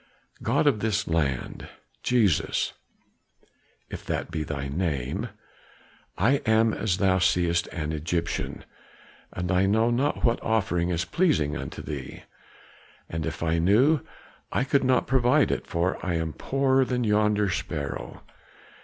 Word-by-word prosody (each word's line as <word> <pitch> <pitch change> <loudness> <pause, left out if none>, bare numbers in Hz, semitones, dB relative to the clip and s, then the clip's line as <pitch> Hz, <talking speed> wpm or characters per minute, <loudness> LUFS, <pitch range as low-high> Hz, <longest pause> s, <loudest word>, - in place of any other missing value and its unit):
God - - +1
of 135 -7 +3
this 105 -1 0
land 75 -6 -2 0.3
Jesus 110 - +1 1.1
if - - -8
that - - -2
be 80 -1 -2
thy 70 -3 -4
name! 70 -4 -2 0.9
I 135 +4 +3
am 110 0 +3
as 95 -5 0
thou 95 -2 +3
seest 85 -2 +2
an 80 -3 -4
Egyptian, 85 +2 -3 0.7
and 90 0 -3
I 95 +1 +3
know 110 +4 +3
not 135 +5 0
what 115 -1 +2
offering 90 -6 0
is 85 -1 0
pleasing 145 - +1
unto - - -6
thee; - - -7 0.9
and 80 -1 -3
if - - -4
I 80 0 +1
knew 120 - +4 0.5
I - - +1
could 135 +1 +2
not 130 -1 +3
provide 125 -1 +3
it, - - -3
for 85 +2 -1
I 90 -2 -1
am 80 -1 -2
poorer 135 -1 +2
than 125 -1 -1
yonder 105 -2 +2
sparrow. 75 -5 -4
95 Hz, 135 wpm, -26 LUFS, 85-120 Hz, 1.1 s, knew